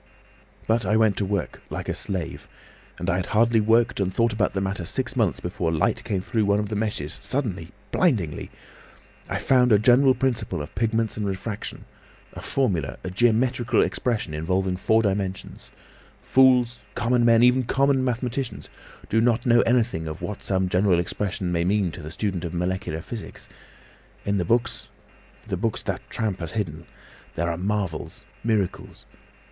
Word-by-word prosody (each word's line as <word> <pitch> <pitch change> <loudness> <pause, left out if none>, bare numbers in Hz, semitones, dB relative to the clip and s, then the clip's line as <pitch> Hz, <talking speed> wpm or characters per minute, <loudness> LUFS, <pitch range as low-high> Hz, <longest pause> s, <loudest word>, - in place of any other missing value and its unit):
"But 115 0 +2
I 105 +3 +2
went 110 -2 +3
to 100 - +1
work—like 100 +1 -4
a - - 0
slave. 95 -5 -4 0.5
And 90 - -5
I 95 -2 +2
had 95 - -2
hardly 115 0 +4
worked 115 +3 +3
and 95 -1 0
thought 115 +3 +1
about 105 -1 0
the 95 - -1
matter 95 -1 -2
six 125 +9 -2
months 110 -8 +1
before 90 -2 -2
light 80 - 0
came 95 -3 -1
through 110 +2 0
one 100 0 +3
of 105 -1 -2
the 110 - -3
meshes 105 -9 -2
suddenly—blindingly! 105 - -1 0.8
I - - -1
found 125 -2 +3
a 105 - +7
general 125 +5 +5
principle 115 -9 -1
of 75 +2 -7
pigments 115 -1 0
and 105 - -2
refraction—a 100 +2 -7
formula, 85 - -1
a 95 - -4
geometrical 120 +4 +2
expression 95 -1 -1
involving 90 +4 0
four 110 +4 +2
dimensions. 95 -2 -3 0.5
Fools, 125 -2 +4 0.2
common 120 +1 +2
men, 115 0 +5
even 125 +1 +5
common 135 +2 +2
mathematicians, 125 +1 -2 0.4
do 110 - +2
not 120 0 +2
know 120 -1 +5
anything 115 -9 +1
of 80 +1 -6
what 105 - -5
some 95 -1 0
general 90 0 +3
expression 90 +1 -2
may 85 -1 +1
mean 95 -1 +1
to 80 - -8
the 75 - -7
student 90 +1 -3
of 85 0 -4
molecular 90 -2 -2
physics. 115 0 -8 0.8
In 100 0 +1
the 90 - 0
books—the 115 -2 -4
books 110 +3 -2
that - - -4
tramp 105 -4 -2
has 85 -3 -5
hidden—there 85 -2 -6
are - - -2
marvels, 95 -4 -3 0.2
miracles! 105 -5 -2
105 Hz, 160 wpm, -24 LUFS, 90-120 Hz, 0.8 s, a